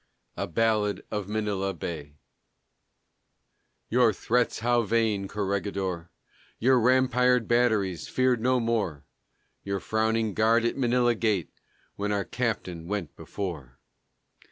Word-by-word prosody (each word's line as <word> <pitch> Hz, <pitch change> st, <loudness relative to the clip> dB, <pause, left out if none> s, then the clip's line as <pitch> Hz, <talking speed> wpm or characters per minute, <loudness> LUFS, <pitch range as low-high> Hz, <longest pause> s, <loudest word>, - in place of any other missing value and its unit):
A -, -, -3 dB
BALLAD 105 Hz, +1 st, +1 dB
OF 105 Hz, -2 st, -3 dB
MANILA 100 Hz, -3 st, -1 dB
BAY 75 Hz, -3 st, -6 dB, 1.7 s
Your 120 Hz, -1 st, +4 dB
threats 120 Hz, +3 st, 0 dB
how 120 Hz, +1 st, +3 dB
vain, 110 Hz, -2 st, 0 dB
Corregidor; 95 Hz, -4 st, -3 dB, 0.5 s
Your 130 Hz, +2 st, +4 dB
rampired 125 Hz, -1 st, +3 dB
batteries, 110 Hz, -7 st, +1 dB
feared 130 Hz, -2 st, +1 dB
no 130 Hz, +1 st, +2 dB
more; 105 Hz, -, -1 dB, 0.6 s
Your 100 Hz, 0 st, -2 dB
frowning 110 Hz, 0 st, 0 dB
guard 115 Hz, +2 st, +3 dB
at 120 Hz, -, 0 dB
Manila 120 Hz, -2 st, +2 dB
gate, 105 Hz, -6 st, -1 dB, 0.5 s
When 105 Hz, +1 st, -2 dB
our 100 Hz, -2 st, 0 dB
Captain 95 Hz, -9 st, -3 dB
went 95 Hz, -6 st, -4 dB
before! 75 Hz, -11 st, -6 dB
110 Hz, 110 wpm, -27 LUFS, 95-120 Hz, 1.7 s, Your